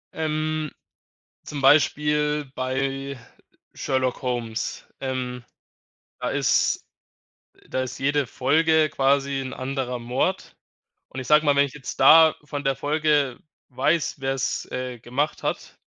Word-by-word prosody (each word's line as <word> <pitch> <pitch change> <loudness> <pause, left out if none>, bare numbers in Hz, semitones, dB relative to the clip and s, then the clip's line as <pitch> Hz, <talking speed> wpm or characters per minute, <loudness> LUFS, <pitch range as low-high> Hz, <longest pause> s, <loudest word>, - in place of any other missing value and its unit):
Ähm, 155 -1 -2 0.7
zum 145 -2 -6
Beispiel 150 +1 +3
bei 135 +1 -2 0.6
„Sherlock 130 -1 -1
Holmes“. 120 -2 -3
Ähm, 125 -2 -4 0.8
da - - -1
ist - - +1 0.8
da 130 - -1
ist 130 - -7
jede 145 +1 +1
Folge 155 +5 +2
quasi 140 0 +1
'n 130 -1 -6
anderer 130 -2 -3
Mord, 125 +10 -2 0.5
und 130 - -7
ich 130 - -7
sage 150 +1 +5
mal, 145 -1 +4
wenn 140 - +5
ich 140 - -6
jetzt 145 -3 -7
da 160 0 +8
von 145 0 -5
der 135 -1 0
Folge 145 -3 +1 0.3
weiß, 155 +5 0
wer's, 135 0 -2
äh, 125 -1 -4
gemacht 135 +6 -2
hat - - -4
135 Hz, 125 wpm, -24 LUFS, 130-150 Hz, 0.8 s, da